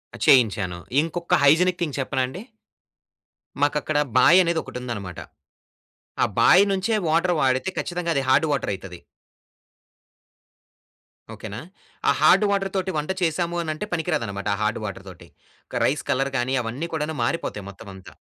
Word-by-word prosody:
అ! - - -9
చేయించాను. 105 -8 +3 0.2
ఇంకొక 170 +2 -1
hygienic 175 +5 +4
thing 155 -5 -2
చెప్పనాండి? 130 +5 -2 1.2
మాకక్కడ 145 +1 0 0.2
బాయనేదొకటుందనమాట. 125 - +2 1.0
ఆ - - +6
బాయి 190 +3 +6
నుంచే 195 +4 0
వాటర్ 170 +3 +2
వాడితే 130 +7 +1
ఖచ్చితంగా 175 -1 -3
అది 140 - +1
హార్డ్ 135 +5 +4
వాటరైతది. 95 -9 -4 2.4
ఓకేనా! 100 +3 -8 0.5
ఆ - - +6
హార్డ్ 210 - +5
వాటర్‌తోటి 195 -1 -1
వంట 150 +4 -2
చేసాము 170 +1 0
అనంటే 155 +4 -4
పనికి 175 0 -2
రాదనమాట. 100 -7 -4
ఆ - - -3
హార్డ్ 105 +1 0
వాటర్‌‌తోటి 95 -3 -9 0.5
క - - -1
రైస్ - - 0
కలర్‌ 135 +1 0
గానీ 130 +2 0
అవన్నీ 125 +9 -4
కూడాను 155 0 -2
మారిపోతాయి 110 -7 -3
మొత్తం 100 +2 -12
అంతా. 95 -1 -13
145 Hz, 125 wpm, -23 LUFS, 115-170 Hz, 2.4 s, ఆ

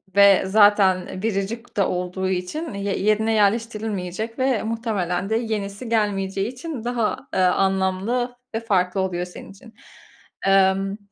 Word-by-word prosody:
ve 200 -1 +6
zaten 195 -2 +3
biricik 225 +3 -3
de 200 - +4
olduğu 180 +1 -2
için 190 - -3
ye 200 0 -2
yerine 215 +2 +2
yerleştirilmeyecek 215 -1 -1
ve 260 -3 +1
muhtemelen 210 -5 -2
de 220 - +1
yenisi 220 -1 -3
gelmeyeceği 195 -3 0
için 260 -1 -7
daha, 240 0 -1 0.2
eee, - - 0
anlamlı 190 +6 +1 0.2
ve - - +1
farklı 190 -4 0
oluyor 180 -2 -2
senin 180 - -11
için. 220 +3 -16 0.7
Emm, 195 +1 +3
200 Hz, 130 wpm, -22 LUFS, 190-225 Hz, 0.7 s, ve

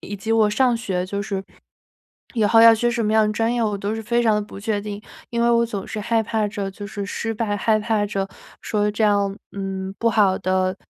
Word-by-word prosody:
以 205 - -7
及 210 +3 -5
我 220 -2 +4
上 245 +2 +2
学 190 -6 -2
就 200 +2 -4
是 200 -1 -3 0.9
以 225 - +2
后 225 +2 +5
要 230 0 +9
学 240 +2 +1
什 235 -1 -1
么 215 - +1
样 220 -1 +4
的 210 - -1
专 225 +2 0
业， 240 -1 0
我 210 -2 0
都 200 +2 -3
是 225 - -5
非 235 +2 +1
常 220 -2 +3
地 210 - +1
不 205 - -10
确 205 -1 -1
定。 205 0 -6 0.3
因 235 0 0
为 235 - +4
我 235 0 +3
总 205 -4 -5
是 220 - -5
害 225 +1 +1
怕 220 -1 -1
着 200 -1 -4
就 205 +1 -8
是 205 -1 -5
失 225 +3 -3
败， 210 -2 -1
害 215 +1 +2
怕 210 -1 0
着 195 -1 -2 0.3
说 210 -1 0
这 215 +2 -3
样， 200 -1 +2 0.2
嗯， 195 -1 -4
不 230 - +2
好 205 -4 +3
的， 185 0 0
210 Hz, 265 characters per minute, -22 LUFS, 200-225 Hz, 0.9 s, 要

